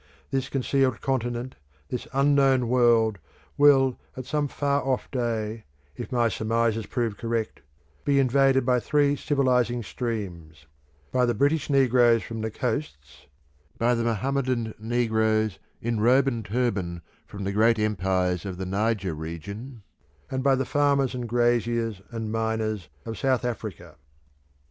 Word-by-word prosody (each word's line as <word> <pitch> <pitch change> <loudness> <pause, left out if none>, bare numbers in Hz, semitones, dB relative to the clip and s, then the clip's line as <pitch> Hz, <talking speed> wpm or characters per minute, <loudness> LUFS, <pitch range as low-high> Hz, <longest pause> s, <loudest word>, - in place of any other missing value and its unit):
This 135 -1 -1
concealed 135 -2 +1
continent, 120 -1 -2 0.3
this 125 - -4
unknown 135 -2 +3
world, 115 -4 +3 0.4
will 135 -3 +5 0.2
at 130 - -5
some 145 +2 0
far 140 0 0
off 130 -2 -2
day, 115 -3 -2 0.3
if - - -7
my 120 -2 +2
surmises 115 -1 0
prove 115 -4 -2
correct, 115 -1 -3 0.4
be 140 -1 +2
invaded 135 0 +3
by 125 -1 +3
three 145 +2 +2
civilising 125 -5 +1
streams; 90 - -5 0.5
by 125 -1 +2
the 120 - +1
British 145 +5 +1
negroes 125 -4 +4
from 115 -1 -6
the 110 - -2
coasts 75 - -5 0.5
by 120 +1 +2
the 115 -1 0
Mohammedan 120 0 -1
negroes 110 -3 +1 0.2
in 115 -1 -1
robe 125 +5 +4
and 115 -4 -2
turban 100 -7 -2 0.2
from 100 -1 -7
the 100 - -1
great 110 +3 +3
empires 95 -4 0
of 95 -3 -5
the 95 - -4
Niger 100 -1 -1
region; 100 - -7 0.5
and 130 -1 -2
by 135 -1 +4
the 130 0 -1
farmers 140 -1 +2
and 125 -2 -4
graziers 120 -3 +1
and 115 -2 -4
miners 110 -5 -2 0.2
of 115 -2 -6
South 130 -2 +1
Africa. 100 -9 -5
120 Hz, 140 wpm, -26 LUFS, 110-130 Hz, 0.5 s, will